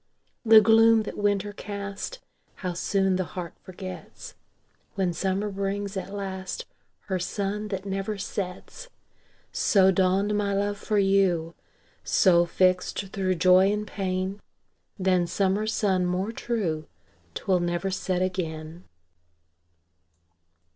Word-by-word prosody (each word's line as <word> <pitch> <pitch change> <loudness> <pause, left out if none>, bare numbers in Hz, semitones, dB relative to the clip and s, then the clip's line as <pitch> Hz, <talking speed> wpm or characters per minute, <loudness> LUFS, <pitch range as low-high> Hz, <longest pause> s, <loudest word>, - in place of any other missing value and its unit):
The 220 -2 +8
gloom 225 +1 +5
that - - -6
winter 205 0 0
cast, 200 - -6 0.4
How 180 -3 -4
soon 190 +1 +1
the 185 - 0
heart 175 -1 -7
forgets, 185 0 -9 0.6
When 185 -3 0
summer 195 +4 -1
brings, 200 +1 -3
at 190 0 -5
last, 190 -2 -5 0.4
Her 190 -2 -3
sun 205 +3 -3
that 195 -1 -4
never 195 +2 -3
sets! 195 - -6 0.6
So 190 -2 +4
dawned 190 +3 +2
my 200 -1 0
love 205 +1 -1
for 210 - -1
you; 190 -4 +2 0.5
So, 175 -2 +4
fixt 185 +2 +1
thro' 185 -2 0
joy 185 +3 +5
and 210 0 -2
pain, 190 0 -3 0.6
Than 185 -3 +2
summer 195 +4 0
sun 195 -4 +1
more 185 +4 -1
true, 185 -11 -2 0.5
'Twill 185 -2 +1
never 175 +2 -1
set 185 -1 -1
again. 165 -2 -4
195 Hz, 120 wpm, -26 LUFS, 185-205 Hz, 0.6 s, The